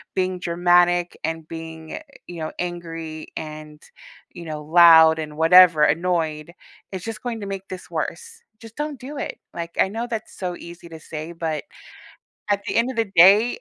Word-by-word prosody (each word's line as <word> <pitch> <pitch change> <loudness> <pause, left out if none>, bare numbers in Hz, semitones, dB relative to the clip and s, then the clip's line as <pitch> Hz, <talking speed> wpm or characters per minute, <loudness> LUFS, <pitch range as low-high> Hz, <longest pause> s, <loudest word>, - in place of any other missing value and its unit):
being 185 -1 -1
dramatic 175 0 +2
and 160 -1 -4
being, 160 -1 -8 0.3
you 175 -1 -8
know, 155 - -4
angry 165 -3 -6
and, 155 -1 -8 0.5
you 175 - -9
know, 155 -1 -6
loud 160 0 +7
and 150 -1 -6
whatever 165 -1 +7
annoyed, 160 -1 0 0.4
it's 190 -2 -6
just 225 +1 -6
going 235 -3 -4
to 200 - -5
make 195 -1 -6
this 185 -1 -9
worse. 465 0 -5 0.2
Just 225 0 -13
don't 295 -2 -4
do 280 +3 -8
it, - - -5 0.2
like, 170 0 -6
I - - +4
know 225 +4 -4
that's 225 -2 -6
so 180 -2 -4
easy 170 0 -12
to 160 -1 -10
say, 155 +1 -7
but 160 -3 -4 0.9
at 200 0 +1
the - - -2
end 235 +3 +2
of 255 - -10
the 220 -4 -1
day, 200 +7 +6
175 Hz, 175 wpm, -22 LUFS, 160-195 Hz, 0.9 s, loud